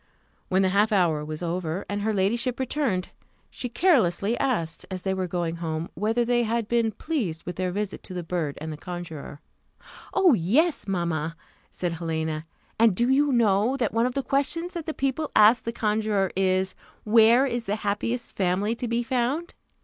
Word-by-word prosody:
When 190 +1 +3
the 190 - +3
half 205 +3 +3
hour 170 -7 +2
was 155 +2 -5
over, 170 +1 -2
and 205 0 -3
her 220 +2 0
ladyship 230 +6 0
returned, 255 -8 -1 0.4
she 245 - -5
carelessly 230 - +2
asked, 170 -12 -1
as 185 -1 -5
they 190 - 0
were 190 -1 -2
going 170 -1 -2
home, 160 -1 -3
whether 220 +7 0
they 240 0 +2
had 230 -1 -1
been 230 -1 +1
pleased 210 - -3
with 180 - -5
their 185 0 -1
visit 205 +1 -3
to 185 - -7
the 180 - -3
bird 165 -4 -3
and 160 +1 -5
the - - -8
conjuror. 160 -4 -7 0.7
"Oh, 365 -6 +5
yes, 250 - +2
mamma!" 165 -4 -1 0.3
said 175 -2 -3
Helena: 160 -1 -3 0.3
"and 225 -4 +5
do 240 +5 +2
you 285 +2 +3
know, 230 +1 +3
that 235 -6 -1
one 230 +2 +2
of 250 - -5
the 275 - 0
questions 330 +7 -1
that 335 -3 -5
the 315 - -2
people 275 +3 -1
ask 215 +3 +6
the 230 - -1
conjuror 210 -4 0
is, 190 0 +1 0.3
_Where 230 +4 +6
is 240 -2 -3
the 200 - -1
happiest 220 +3 -2
family 195 +3 +1
to 245 - -3
be 235 +1 0
found? 260 +7 -1
205 Hz, 185 wpm, -26 LUFS, 175-240 Hz, 0.7 s, ask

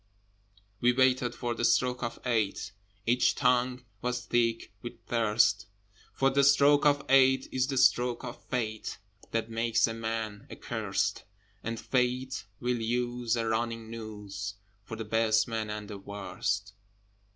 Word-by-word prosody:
We 125 +1 +4
waited 130 -1 +2
for 120 -1 -2
the 120 - -4
stroke 125 +2 +2
of 120 -1 -4
eight: 110 -5 0 0.3
Each 120 +2 +3
tongue 125 -1 +1 0.2
was 125 -1 -2
thick 115 -3 0
with 120 - -6
thirst: 110 -2 +2 0.4
For 135 0 +2
the 140 +1 +3
stroke 140 +1 +5
of 145 0 +2
eight 130 0 +5
is 130 0 +1
the 135 -2 -2
stroke 125 -1 +3
of - - -8
Fate 110 -4 -3 0.3
That 115 0 -2
makes 115 0 +2
a 115 - -3
man 110 -2 -4
accursed, - - -2 0.4
And 115 0 -3
Fate 130 +1 -1
will 125 -1 -1
use 120 0 0
a 115 -1 -1
running 115 0 -2
noose 105 -3 -6 0.3
For 115 - -6
the 110 0 -5
best 110 0 +2
man 110 -2 -3
and 105 -1 -5
the 100 -1 -7
worst. 100 0 -3
115 Hz, 145 wpm, -29 LUFS, 110-125 Hz, 0.4 s, stroke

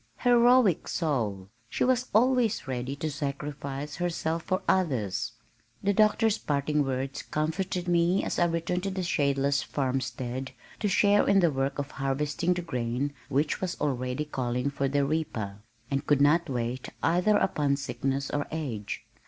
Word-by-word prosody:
Heroic 245 - +5
soul! 110 - -1 0.2
She - - 0
was 255 0 +2
always 235 - +2
ready 130 +1 -3
to 155 +2 -3
sacrifice 140 0 -4
herself 170 -2 -1
for 185 +3 -2
others. 130 - 0 0.5
The 200 +1 +2
Doctor's 215 +1 +3
parting 145 +1 0
words 135 0 -3
comforted 175 +4 -2
me 175 +2 +3
as - - -2
I 175 - +5
returned 170 +1 -1
to 195 - -2
the 190 -1 -3
shadeless 140 -3 +1
farmstead 130 -1 -3 0.3
to 210 - 0
share 205 +1 +4
in 200 -1 +5
the 170 -4 +4
work 135 0 -1
of 140 -1 -3
harvesting 145 +6 0
the 175 - -3
grain 125 -1 -2 0.2
which 145 +3 0
was 185 -1 -3
already 130 0 -1
calling 125 -1 -2
for 140 -1 -1
the 140 +1 +1
reaper, 120 -10 -2 0.3
and 135 +1 0
could 145 -2 +4
not 155 +3 +4
wait 125 0 -3
either 180 +5 +3
upon 145 -8 +1
sickness 135 0 -2
or 145 0 -1
age. 130 -10 -4
145 Hz, 155 wpm, -28 LUFS, 135-175 Hz, 0.5 s, Heroic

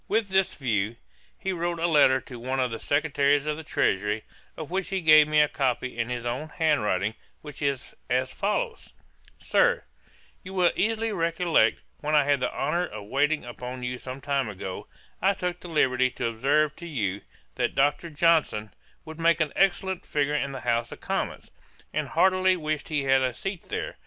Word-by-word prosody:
With 215 -1 +1
this 190 0 +2
view, 110 -5 -1 0.4
he 190 - -2
wrote 175 0 -2
a 165 - 0
letter 145 -5 +5
to 125 -2 -10
one 130 +3 -2
of 125 -2 +1
the 115 - -4
Secretaries 145 -1 +2
of 150 0 -1
the 160 - -8
Treasury, 105 -4 0 0.3
of 155 0 -7
which 190 0 -1
he 195 0 -1
gave 155 -3 +7
me 155 0 +3
a 150 - +4
copy 130 -3 -1
in 120 0 -2
his 120 -1 -4
own 125 +6 -3
hand 160 -6 +1
writing, 105 0 0 0.3
which 150 -2 -10
is 140 -3 -2 0.2
as 130 +1 +1
follows: 455 - -2 0.4
'SIR, - - +2 0.6
'You 190 +1 -8
will 180 -2 +4
easily 225 +1 0
recollect, 170 -2 +2 0.2
when 150 +1 0
I 150 - +6
had 140 -1 +2
the 125 - -1
honour 170 +6 -1
of 105 -1 -9
waiting 150 +1 +1
upon 125 +1 -7
you 125 0 -3
some 130 +1 -7
time 140 -4 0
ago, 95 -2 -6 0.3
I 195 +2 +3
took 180 -1 -3
the - - -10
liberty 130 -5 +2
to 125 - -4
observe 140 +7 +1
to 170 - -8
you, 105 - -2 0.3
that - - -1
Dr. 145 +4 +1
Johnson 155 -9 +2 0.3
would 160 0 -9
make 165 0 +3
an 155 -3 0
excellent 190 -1 +1
figure 145 0 0
in 140 -2 -1
the 135 -2 -6
House 115 0 0
of - - -9
Commons, - - -3 0.4
and - - -1
heartily 185 0 +3
wished 155 -2 -3
he 150 -3 0
had 135 0 +4
a 130 -2 0
seat 195 +2 -5
there. - - -4
145 Hz, 190 wpm, -26 LUFS, 125-170 Hz, 0.6 s, gave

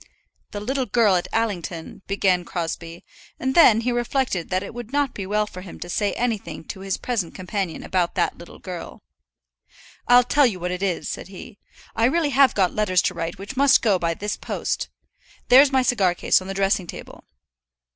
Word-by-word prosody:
"The 205 - -6
little 260 +4 -2
girl 220 -5 +3
at 175 - -1
Allington 185 -8 -3
" - - -48
began 190 -2 +1
Crosbie; 170 -1 -5 0.3
and 260 +1 -1
then 230 -9 +6
he 245 +2 0
reflected 240 -6 -1
that 185 +1 0
it 200 - -8
would 240 0 -8
not 285 -2 0
be 195 -2 -6
well 210 +1 +1
for 185 -3 -10
him 180 -2 -11
to 175 - -7
say 205 +3 0
anything 230 -8 -3
to - - -6
his 195 -1 -3
present 215 -9 -3
companion 185 -2 -4
about 180 -2 -1
that - - 0
little 170 - -13
girl. 180 -3 -8 1.0
"I'll 245 0 +7
tell 285 +2 +4
you 195 -6 -4
what 180 +1 -3
it 180 +1 -4
is," 190 -4 -1
said - - -5
he. 200 +3 -11 0.4
"I 225 - +2
really 295 +3 +1
have 270 -1 +4
got 190 -3 +2
letters 185 -4 +2
to - - 0
write 165 +1 -4
which 200 +7 -8
must 275 0 +4
go 205 -5 +3
by 170 -1 -1
this 210 +3 -4
post. - - -3 0.6
There's 265 +3 +7
my 260 -1 +3
cigar 200 -9 +2
case - - +2
on 185 - -9
the 195 - -5
dressing 195 -1 +1
table." - - -10
200 Hz, 200 wpm, -23 LUFS, 180-245 Hz, 1.0 s, I'll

